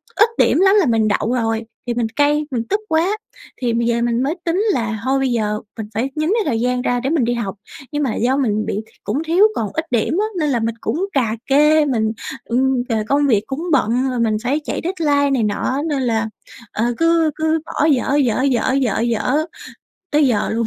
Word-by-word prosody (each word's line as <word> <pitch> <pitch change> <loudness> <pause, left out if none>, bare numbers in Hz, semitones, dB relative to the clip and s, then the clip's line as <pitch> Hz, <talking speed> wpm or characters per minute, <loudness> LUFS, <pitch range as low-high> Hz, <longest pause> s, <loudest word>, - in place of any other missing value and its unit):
ít 430 +3 +5
điểm - - +3
lắm 385 +2 +5
là 355 - +3
mình 225 -3 +2
đậu 215 +3 0
rồi, 225 -2 0 0.2
thì 240 - 0
mình 235 -2 0
cay, 295 +1 +2
mình 235 -3 -1
tức 410 +2 +1
quá. 345 +7 +1 0.4
Thì 240 -2 0
bây 235 0 0
giờ 235 0 +1
mình 240 +1 +1
mới 300 +5 -1
tính 340 +3 +1
là 225 -3 -2
thôi 270 +1 +1
bây 265 -1 +1
giờ 210 -2 0 0.2
mình 215 -1 -5
phải 240 +6 -1
nhín 310 +2 0
cái 450 -2 +1
thời 230 -6 0
gian 250 +1 0
ra 245 -1 0
để 265 +3 -2
mình 310 -6 +2
đi 240 - 0
học. 215 -4 -3 0.4
Nhưng 295 0 -1
mà 245 - -1
do 255 +4 +1
mình 215 -5 0
bị 210 - -2
th - - -24
cũng 300 +5 -2
thiếu 355 +6 +4
còn 215 -3 -2
ít 320 0 -2
điểm 245 - +1
á - - +1
nên 300 -2 +1
là 240 -4 +1
mình 225 0 -2
cũng 365 +6 -1
cà 230 -5 +1
kê, 300 +2 +4
mình, 220 -5 0 0.3
ừ, 240 - -2 0.5
công 285 +1 +3
việc 215 -4 +3
cũng 270 +4 -4
bận, 255 0 +2
rồi 250 -2 -2
mình 220 -2 +1
phải 280 +5 +1
chạy - - -3
deadline 295 -6 +1
này 250 -5 +1
nọ 235 +6 -1
nên 280 -3 0
là, 225 -2 0 0.4
ờ, 225 - -1
cứ 330 -1 +3
cứ 315 0 +1
bỏ 300 - -1
dở, 280 -1 +2
dở, 255 -4 +2
dở, 260 -1 +1
dở, 260 -6 +1
dở 250 +6 0 0.7
tới 295 -1 +3
giờ 230 -5 +1
luôn. 230 0 0
260 Hz, 230 wpm, -19 LUFS, 230-300 Hz, 0.7 s, ít